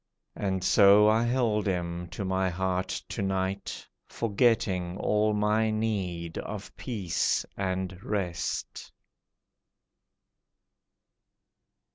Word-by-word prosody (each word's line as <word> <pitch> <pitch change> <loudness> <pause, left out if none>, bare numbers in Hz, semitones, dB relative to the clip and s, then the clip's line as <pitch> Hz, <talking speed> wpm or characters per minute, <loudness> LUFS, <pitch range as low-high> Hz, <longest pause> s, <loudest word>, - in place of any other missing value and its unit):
And 95 -2 -2
so 100 +2 +6
I 110 +1 +4
held 120 -4 +1
him 90 -2 -2
to 90 +3 -5
my 95 0 +1
heart 90 +1 -1 0.2
to - - -4
night, 95 0 -2 0.2
Forgetting 100 -5 +1
all 105 0 +2
my 105 +1 +2
need 95 -7 -2
of - - -7
peace 100 -9 -1
and 95 -1 -2
rest. 95 -5 -3
95 Hz, 90 wpm, -28 LUFS, 90-105 Hz, 0.2 s, so